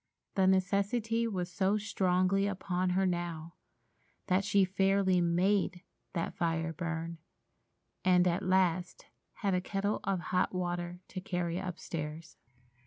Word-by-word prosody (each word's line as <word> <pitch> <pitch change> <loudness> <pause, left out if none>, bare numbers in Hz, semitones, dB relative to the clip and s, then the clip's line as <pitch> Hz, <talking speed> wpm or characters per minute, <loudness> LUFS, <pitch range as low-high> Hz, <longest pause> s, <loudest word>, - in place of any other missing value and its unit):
The 190 -2 +3
necessity 200 +5 +1
was 180 -5 -3
so 190 +4 +2
strongly 195 -1 +1
upon 185 -2 -1
her 190 - +3
now 170 -2 -3 0.7
that 185 +1 +2
she 200 -1 +3
fairly 190 -1 +2
made 180 +1 +1 0.3
that 165 -2 -2
fire 165 -1 -1
burn, 165 0 -4 0.8
and 180 -1 +5
at 175 +2 +1
last 185 -2 +1 0.3
had 200 -3 -1
a 180 - +2
kettle 200 +2 -1
of 195 -2 0
hot 180 +1 +2
water 175 0 -3
to 185 - -5
carry 175 -2 -2
upstairs. 165 -3 -5
185 Hz, 125 wpm, -32 LUFS, 175-195 Hz, 0.8 s, and